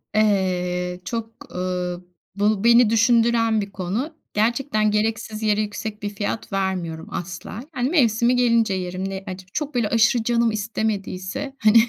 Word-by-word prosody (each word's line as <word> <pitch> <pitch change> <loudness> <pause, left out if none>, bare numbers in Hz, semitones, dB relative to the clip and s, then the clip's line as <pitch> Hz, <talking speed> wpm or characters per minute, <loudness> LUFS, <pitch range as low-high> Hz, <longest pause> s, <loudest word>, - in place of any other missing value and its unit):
Eee, 180 -4 +1
çok, 230 +2 -4 0.2
uuu, 180 -1 -3 0.3
bu 205 0 +1
beni 235 -1 +6
düşündüren 230 -1 +3
bir 200 0 -6
konu. 210 - -3 0.2
Gerçekten 215 0 +1
gereksiz 215 0 -1
yere 210 0 +2
yüksek 210 0 -5
bir 205 - -1
fiyat 205 +2 -4
vermiyorum 185 -4 -2
asla. 180 +6 -6
Hani, 255 -4 -1
mevsimi 240 -6 +3
gelince 230 -4 +3
yerim, 185 +1 -3
ne 190 0 -5
ac 185 0 -7
çok 300 -3 -3
böyle 230 -4 +1
aşırı 230 +1 +3
canım 235 0 +2
istemediyse, 215 +2 -3
hani, 215 +1 +5
215 Hz, 140 wpm, -23 LUFS, 190-230 Hz, 0.3 s, beni